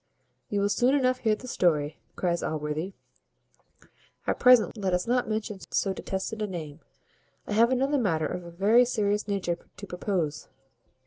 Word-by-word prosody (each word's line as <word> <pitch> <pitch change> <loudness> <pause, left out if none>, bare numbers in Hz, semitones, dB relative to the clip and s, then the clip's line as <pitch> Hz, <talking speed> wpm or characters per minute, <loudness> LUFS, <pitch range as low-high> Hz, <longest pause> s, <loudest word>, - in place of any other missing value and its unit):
"You 205 -1 0
will 200 - +2
soon 245 +6 +3
enough 255 -2 +2
hear 220 -2 +2
the 255 - -11
story," 155 -8 +1 0.2
cries 175 -2 0
Allworthy; 155 +4 -3 1.3
"at - - -1
present 250 -3 +6
let 190 -4 0
us 180 - -1
not 245 -1 +1
mention 215 -2 -3
so 195 - 0
detested 195 +4 -4
a 210 - 0
name. 160 -6 -6 0.7
I - - -4
have 230 +3 +5
another 270 +3 +1
matter 165 -9 +1
of 180 +3 -4
a 170 - -9
very 205 +8 +4
serious 210 -4 0
nature 185 -4 -1 0.2
to 200 - -7
propose. 180 -5 -2
200 Hz, 165 wpm, -27 LUFS, 175-230 Hz, 1.3 s, present